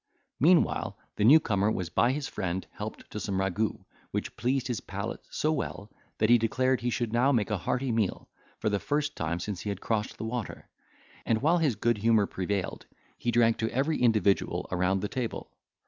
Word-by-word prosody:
Meanwhile, 140 - +3 0.2
the 105 - +1
new 140 +9 +8
comer 105 -7 +1
was 90 -5 -3
by 120 - +3
his 145 +1 -2
friend 95 0 -3
helped - - -7
to - - -4
some 95 - -2
ragout, 95 +3 -1 0.2
which - - -4
pleased 130 +1 0
his 120 -4 -2
palate - - -5
so 155 - 0
well, 110 -8 -4 0.3
that 110 - +3
he 120 - +7
declared 130 +3 +1
he 120 - 0
should 120 -2 -2
now 125 +4 +4
make 110 -6 +1
a 105 - +1
hearty 125 +7 -1
meal, 110 -4 -1 0.3
for - - -3
the 100 -1 0
first 145 +4 -1
time 80 +2 -2
since 100 0 -4
he 105 - -4
had 100 -2 -3
crossed 105 -1 -2
the - - -5
water; 115 -1 -5 0.6
and, 110 +2 0
while 170 +3 +4
his 150 -8 +2
good 115 +1 +1
humour 110 -1 +4
prevailed, 95 0 -3 0.3
he 120 - -1
drank 115 -1 +4
to 115 0 -1
every 140 +4 0
individual 110 -5 +2
around 95 +1 +1
the 105 - -1
table. 120 +1 -4
115 Hz, 195 wpm, -28 LUFS, 100-125 Hz, 0.6 s, new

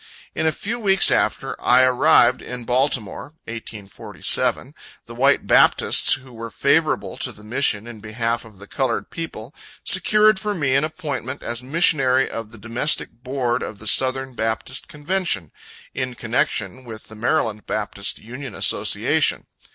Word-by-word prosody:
In 160 - -1
a - - +3
few 225 +10 -4
weeks 195 -3 +5
after - - 0
I 125 +1 +5
had 130 - +5
arrived 125 -1 +4
in 125 -1 -7
Baltimore, 125 0 -1
(1847,) 110 -3 -2 0.3
the - - -11
white - - +2
Baptists - - +4
who 130 -1 -6
were 115 0 -7
favorable 95 - 0
to - - -2
the 105 - -16
mission 110 -2 0
in 120 -2 -10
behalf 115 +2 -3
of 110 -3 -16
the 100 - -12
colored 135 +5 -2
people, 150 -6 -7 0.3
secured 215 +1 +4
for 210 0 -2
me 140 -7 0
an 140 +2 +3
appointment 145 -4 -5
as 120 +1 -4
missionary 135 -2 +2
of 115 -1 -6
the 115 - -14
Domestic 115 +8 -1
Board 125 0 -3
of 105 - -6
the 110 - -12
Southern 130 +3 +2
Baptist 115 +3 -2
Convention, 150 - -2 0.4
in 130 -2 -4
connection 115 -1 -2
with 110 -3 -9
the - - -13
Maryland 110 -2 -1
Baptist 105 -2 -1
Union 130 +4 -9
Association. - - +1
125 Hz, 150 wpm, -21 LUFS, 110-140 Hz, 0.4 s, weeks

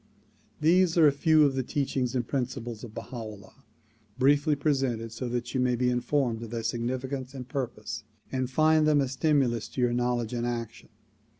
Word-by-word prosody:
These 175 +2 +3
are 165 - +7
a 145 - +7
few 155 +2 +4
of 140 -2 +3
the 135 - 0
teachings 130 -1 -1
and 120 -2 -1
principles 120 -4 -3
of 110 -3 -9
Baha 125 - -7
'Ullah 110 -4 -10 0.5
briefly 145 +3 +3
presented 135 -6 0
so 120 +2 -4
that 120 0 -3
you 130 - 0
may 125 -1 +2
be 125 +1 +1
informed 125 -1 0
of 115 - -7
their 115 0 -4
significance 130 +3 -3
and 125 -2 -7
purpose 115 -5 -4 0.3
and 130 -1 -1
find 155 +3 +4
them 150 -1 +4
a 135 - +1
stimulus 130 -4 +1
to 130 - -4
your 120 -1 +2
knowledge 120 -1 0
and 120 0 -1
action. 115 -1 -5
125 Hz, 185 wpm, -28 LUFS, 120-140 Hz, 0.5 s, are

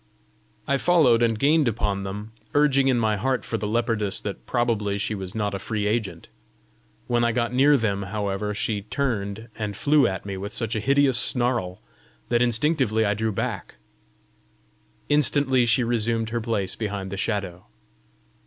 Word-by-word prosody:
I 140 - +2
followed 145 -8 +4
and 115 -2 +2
gained 150 +3 +3
upon 105 -3 -1
them, 100 +3 -6 0.2
urging 140 -2 +4
in 130 -2 +3
my 110 -2 +1
heart 130 +4 -1
for 115 - -3
the 105 - -3
leopardess 110 -2 0
that 100 - -6
probably 110 -5 0
she 105 +2 -2
was 95 -1 -6
not 105 -2 -1
a 100 - -3
free 105 +1 -3
agent. 105 -6 -2 0.8
When 120 -1 +1
I 120 - +2
got 120 +1 -1
near 140 +3 +5
them, 100 -4 -1
however, 100 0 -3
she 105 0 -2
turned 110 -2 -3
and 105 -2 -3
flew 145 -3 +4
at 95 -1 -4
me 100 -1 -5
with 100 +2 -6
such 115 -2 -2
a - - 0
hideous 135 +1 +3
snarl, 120 -7 +1 0.5
that 120 - +2
instinctively 120 -2 +1
I 100 - +2
drew 110 +1 -1
back: 95 - -4 1.3
instantly 140 -4 +3
she 115 +3 +3
resumed 115 -1 -1
her 120 0 -1
place 105 -5 -2
behind 100 -3 -4
the - - -3
Shadow. 95 -4 -3
110 Hz, 165 wpm, -24 LUFS, 100-125 Hz, 1.3 s, near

